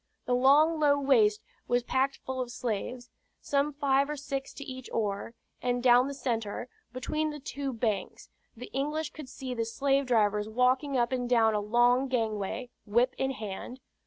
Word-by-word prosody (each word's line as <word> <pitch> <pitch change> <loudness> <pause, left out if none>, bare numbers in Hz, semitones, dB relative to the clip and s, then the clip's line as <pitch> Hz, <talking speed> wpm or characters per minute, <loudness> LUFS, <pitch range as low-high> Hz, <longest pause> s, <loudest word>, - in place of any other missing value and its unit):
The 250 - 0
long 290 +6 +5
low 285 -1 +4
waist 225 -7 +3 0.2
was 245 0 +1
packed 265 +2 0
full 260 0 -3
of 250 - -3
the 240 - -10
slaves, 245 +2 -4 0.3
some 285 +1 0
five 280 -1 +1
or 300 - -2
six 275 -1 -4
to 280 - -7
each 260 -2 -8
oar, 210 +1 -2 0.3
and 245 0 -1
down 250 +1 +6
the 280 - -5
centre, 235 -2 -3 0.2
between 305 +5 -2
the 295 0 -6
two 275 0 -4
banks, 220 -5 -2 0.3
the 250 - -9
English 300 +3 -2
could 300 -5 -10
see 260 -1 -6
the 230 -2 -1
slave 275 +4 0
drivers 210 -3 +2
walking 255 +4 +2
up 240 0 +1
and 250 -2 -1
down 225 -3 +4
a 210 - +1
long 240 +5 +3
gangway, 230 0 -2 0.2
whip 240 +5 +2
in 265 - +1
hand. 225 +1 -6
250 Hz, 180 wpm, -29 LUFS, 230-275 Hz, 0.3 s, down